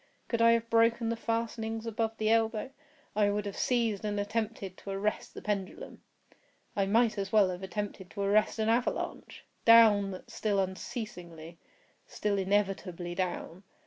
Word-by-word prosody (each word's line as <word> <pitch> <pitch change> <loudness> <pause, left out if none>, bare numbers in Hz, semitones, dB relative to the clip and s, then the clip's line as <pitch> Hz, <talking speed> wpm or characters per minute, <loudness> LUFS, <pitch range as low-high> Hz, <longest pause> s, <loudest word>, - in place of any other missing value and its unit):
Could 230 -1 0
I 230 0 +7
have 230 0 0
broken 230 0 +3
the 230 - 0
fastenings 225 -1 -3
above 225 0 -2
the 215 0 +1
elbow, 225 +2 +1 0.4
I 205 -1 +3
would 205 0 -1
have 200 - -5
seized 230 -5 0
and 205 -1 -1
attempted 205 -2 -3
to - - -10
arrest 195 +2 -2
the - - -8
pendulum. 200 -3 -4 0.7
I 195 -1 +1
might 220 0 +3
as 195 0 -3
well 205 -4 +5
have 180 0 -6
attempted 190 0 -5
to 200 - -6
arrest 205 +3 +2
an 220 0 0
avalanche! 235 +2 -1 0.2
Down—still 215 -1 +4
unceasingly—still 185 0 -5
inevitably 190 -3 -1
down! 180 -1 -3
210 Hz, 145 wpm, -30 LUFS, 195-225 Hz, 0.7 s, I